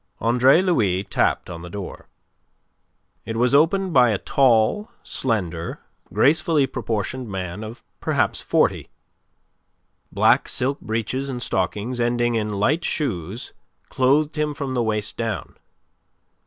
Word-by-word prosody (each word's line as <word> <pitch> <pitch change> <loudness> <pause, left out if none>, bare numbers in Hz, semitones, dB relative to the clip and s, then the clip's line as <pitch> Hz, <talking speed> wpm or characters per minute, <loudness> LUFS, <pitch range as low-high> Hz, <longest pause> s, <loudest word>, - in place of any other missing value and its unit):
Andre 125 - +4
Louis 105 - +1
tapped - - 0
on 85 -2 -8
the 90 - -9
door. 100 +1 -8 1.2
It 115 +2 -5
was 125 +3 +2
opened 175 +5 +3
by 125 -2 +6
a 105 - +1
tall, 130 - +2
slender, 90 -9 -2 0.3
gracefully 155 0 +3
proportioned 120 -1 -3
man 95 +1 -5
of 110 +2 -9 0.2
perhaps - - 0
forty. - - +1 1.2
Black - - +3
silk 135 +3 -1
breeches 115 +5 -2
and 125 -2 -4
stockings 105 +4 -1
ending 120 0 +1
in 110 -2 -1
light 140 +12 +1
shoes 110 - -3 0.4
clothed 145 +4 +2
him 150 -1 -1
from 140 -3 -4
the 125 - +1
waist 105 -2 -2
down. 115 -2 -4
120 Hz, 125 wpm, -22 LUFS, 105-140 Hz, 1.2 s, by